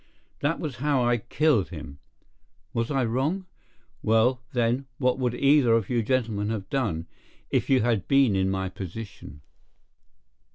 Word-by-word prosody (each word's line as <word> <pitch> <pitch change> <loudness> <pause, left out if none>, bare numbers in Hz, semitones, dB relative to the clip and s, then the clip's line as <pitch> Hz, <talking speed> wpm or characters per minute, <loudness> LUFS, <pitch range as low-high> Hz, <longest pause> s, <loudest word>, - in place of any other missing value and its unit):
That 145 +4 0
was 150 -6 -4
how 140 -1 +1
I 120 0 +3
killed 120 - +1
him. 70 +1 -9 0.7
Was 115 0 -1
I 135 -4 +1
wrong? 140 +12 -1 0.6
Well, 115 +3 +3
then, 125 +2 0
what 125 -1 +1
would 125 -2 0
either 140 -3 +4
of 115 -2 +1
you 120 -1 +2
gentlemen 110 -3 0
have 105 -4 -3
done, 100 -12 -1 0.5
if - - +1
you 135 -2 +4
had 110 -7 0
been 135 -7 +4
in 95 0 +1
my 95 0 -1
position? 95 - -8
120 Hz, 150 wpm, -26 LUFS, 105-135 Hz, 0.7 s, either